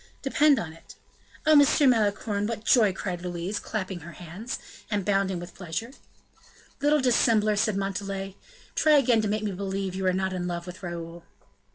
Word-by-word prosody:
"Depend 285 +1 +4
on 160 -2 -4
it." 165 - -15 0.5
"Oh! 310 0 +6
Monsieur 290 +1 +5
Malicorne, 210 -3 +2
what 225 -1 -5
joy!" 220 -6 +5
cried 180 -2 -4
Louise, 180 +3 -3
clapping 190 -4 -4
her 170 +1 -10
hands, 185 +7 -6 0.3
and 205 -3 -1
bounding 195 -3 +1
with 175 0 -9
pleasure. 180 +6 -5 0.9
"Little 295 +1 +3
dissembler!" 225 -4 +3
said 210 -1 +1
Montalais, 195 0 -3 0.4
"try 310 0 +4
again 240 -5 +4
to 215 - -1
make 215 +1 -1
me 210 - -1
believe 195 0 -3
you 190 0 -2
are - - +4
not 190 +1 -1
in 180 -1 -3
love 170 -1 -4
with 180 +1 -9
Raoul." 170 -1 -7
195 Hz, 175 wpm, -26 LUFS, 180-220 Hz, 0.9 s, Oh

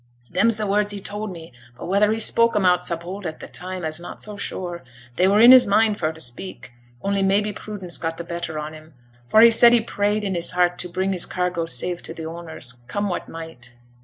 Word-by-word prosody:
Them's 210 +5 +2
the 215 - -2
words 205 +1 +1
he 205 - -4
told 205 +1 -5
me, 165 -6 -11 0.2
but - - -8
whether 200 +3 +2
he 220 - -1
spoke 230 +1 +3
'em 205 -2 +2
out 180 0 +3
so 170 - -2
bold 180 +3 -7
at 155 - -7
t' - - -8
time, 185 -1 -5
I'se 155 +1 -3
not 175 - -9
so 210 -1 -8
sure; 175 -3 -5 0.3
they 185 - +3
were 200 +2 +4
in 235 +3 +9
his 255 -3 +8
mind 210 +1 +2
for 155 -2 0
t' 160 - -14
speak, 125 -1 -5 0.3
only 200 0 0
maybe 200 +2 +1
prudence 195 -4 -5
got 165 0 -3
t' 170 - -5
better 170 -2 -5
on 150 +1 -5
him, 155 -1 -14 0.3
for 215 - +5
he 230 0 +8
said 235 +1 +7
he 240 - +4
prayed 210 -1 -1
i' - - -1
his 175 -1 -2
heart 175 0 +1
to 180 - -5
bring 185 +2 -1
his 180 -3 0
cargo 180 -2 -2
safe 175 +1 -1
to 165 - -9
t' 160 - -7
owners, 160 -7 -6
come 205 +10 -2
what 175 - -4
might. 160 -8 -10
180 Hz, 240 wpm, -22 LUFS, 165-205 Hz, 0.3 s, in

